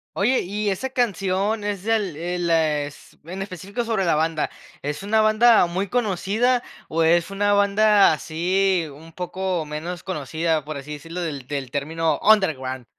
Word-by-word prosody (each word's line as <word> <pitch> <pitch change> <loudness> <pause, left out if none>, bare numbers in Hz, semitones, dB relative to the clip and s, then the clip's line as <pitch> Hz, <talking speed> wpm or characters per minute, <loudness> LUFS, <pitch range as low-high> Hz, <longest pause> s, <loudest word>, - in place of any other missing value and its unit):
Oye, 245 +7 +2
y 205 +3 -2
esa 200 +7 -2
canción 205 -3 0
es 205 -2 -3
del 210 -6 0
eh, 175 +3 -3
les 155 -4 -1
en 185 +3 -6
específico 195 +4 -5
sobre 220 -4 0
la 170 - +3
banda, 160 0 0 0.3
¿es 150 +3 -3
una 215 +2 +2
banda 215 0 +5
muy 185 +3 -2
conocida, 225 +3 +1 0.3
o 165 - -1
es 170 +3 +3
una 205 +1 +1
banda, 205 -1 +5
así, 180 +3 0
un 160 +3 -14
poco 180 -1 -3
menos 160 +4 -6
conocida, 160 -1 -1
por 155 -1 -5
así 140 +2 -7
decirlo, 165 +4 -6
del 145 -6 -5
del 135 -3 -4
término 160 +4 -1
underground? 135 - +2
180 Hz, 155 wpm, -23 LUFS, 160-205 Hz, 0.3 s, banda